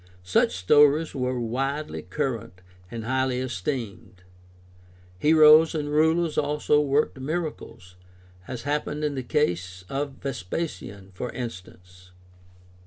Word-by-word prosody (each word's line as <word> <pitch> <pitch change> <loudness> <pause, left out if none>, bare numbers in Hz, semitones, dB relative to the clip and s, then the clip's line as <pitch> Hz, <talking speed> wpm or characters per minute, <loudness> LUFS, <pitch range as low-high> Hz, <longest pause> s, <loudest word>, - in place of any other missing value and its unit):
Such 90 0 +2
stories 145 - +4
were 125 -2 -2
widely 135 +6 -2
current 115 -11 -4 0.3
and 115 0 -6
highly 130 0 0
esteemed. 115 -5 -5 1.0
Heroes 155 - +6
and 145 -1 -2
rulers 160 +1 +2
also 150 0 +1
worked 145 -1 0
miracles, 145 - -5 0.5
as 125 -2 -6
happened 150 +1 -2
in 150 -1 0
the 135 - -3
case 90 - -1
of 140 0 -3
Vespasian, 100 - -5
for 125 +7 -5
instance. 90 -5 -9
130 Hz, 105 wpm, -25 LUFS, 100-150 Hz, 1.0 s, Heroes